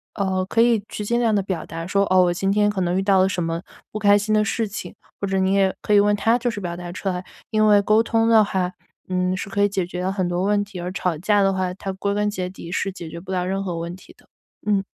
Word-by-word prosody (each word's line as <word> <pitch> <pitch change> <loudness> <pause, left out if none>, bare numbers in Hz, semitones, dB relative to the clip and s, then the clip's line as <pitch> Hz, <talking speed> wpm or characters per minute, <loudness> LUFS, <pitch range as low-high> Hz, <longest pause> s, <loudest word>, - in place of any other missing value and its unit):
呃， 190 -2 0
可 225 +4 +1
以 230 -3 +3
去 210 - -5
尽 235 +3 +1
量 230 -3 +2
地 200 - +1
表 185 -2 -3
达 165 0 -6
说： 200 +2 +1
“哦， 185 0 +5
我 175 - +2
今 195 +2 0
天 205 +1 +3
可 205 -2 -2
能 180 0 0
遇 190 - 0
到 195 -1 +4
了 190 - +3
什 180 -3 -2
么， 165 +1 -2 0.3
不 215 - -4
开 205 -1 +5
心 210 +1 -1
的 215 0 +4
事 220 +2 -1
情。” 200 - -7 0.3
或 200 - -1
者 195 0 0
你 190 0 +2
也 195 -1 +3
可 210 - 0
以 205 - +7
问 205 0 +3
她 225 +4 +2
就 245 0 -1
是 215 - -5
表 175 -1 -4
达 175 -1 -7
出 185 - -6
来， 180 0 -3 0.3
因 215 0 +2
为 205 -1 +6
沟 215 +2 +3
通 225 0 +1
的 220 -2 +6
话， 185 -2 -1 0.4
嗯， 185 0 0
是 190 +1 -5
可 200 +1 +1
以 205 - +3
解 195 -3 -1
决 180 +1 -3
很 185 -2 -1
多 175 +1 -1
问 205 +1 +2
题， 200 -2 -9
而 175 +1 -4
吵 180 -3 -1
架 205 +5 +2
的 195 0 +3
话， 185 -1 -1
它 195 +1 -5
归 200 +1 -2
根 210 0 +1
结 185 -3 -3
底 175 -2 -10
是 195 +1 -1
解 170 -3 -8
决 170 - -7
不 190 +2 -9
了 180 -1 0
任 195 +1 -1
何 180 -3 -3
问 170 +1 -5
题 185 - -16
的。 - - -25 0.4
嗯。 200 -2 +2
195 Hz, 310 characters per minute, -22 LUFS, 180-205 Hz, 0.4 s, 以